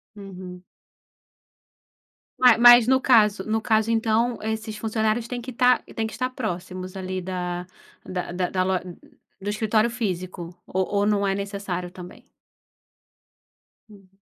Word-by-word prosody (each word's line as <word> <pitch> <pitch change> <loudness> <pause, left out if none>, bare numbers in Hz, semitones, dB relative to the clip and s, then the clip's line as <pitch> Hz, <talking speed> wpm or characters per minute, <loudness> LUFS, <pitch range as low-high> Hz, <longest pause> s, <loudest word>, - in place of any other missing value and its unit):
Uhum. 185 -3 -10 1.7
Ma 250 -3 +6
mas 240 0 +8
no 260 0 +3
caso 210 -6 +4
no 220 0 +1
caso, 220 0 +1
então 230 +1 +1
esses 220 0 -4
funcionários 220 +1 -1
têm 245 0 -5
que 255 +2 -7
estar 250 +1 +3
têm 225 -1 -1
que 220 - -9
estar 255 0 -2
próximos, 185 -6 -5
ali 185 0 -4
da 180 -1 -4 0.4
da 180 -1 -4
da 180 0 -2
da 185 -1 0
lo 190 0 0 0.7
do 205 - -3
escritório 215 +1 +1
físico 185 -6 -4
ou 190 0 -1
ou 205 0 0
não 205 -1 +1
é 195 - 0
necessário 200 -3 -4
também? 180 -1 -12 1.6
Uhum. 195 -2 -19
205 Hz, 140 wpm, -24 LUFS, 185-225 Hz, 1.7 s, mas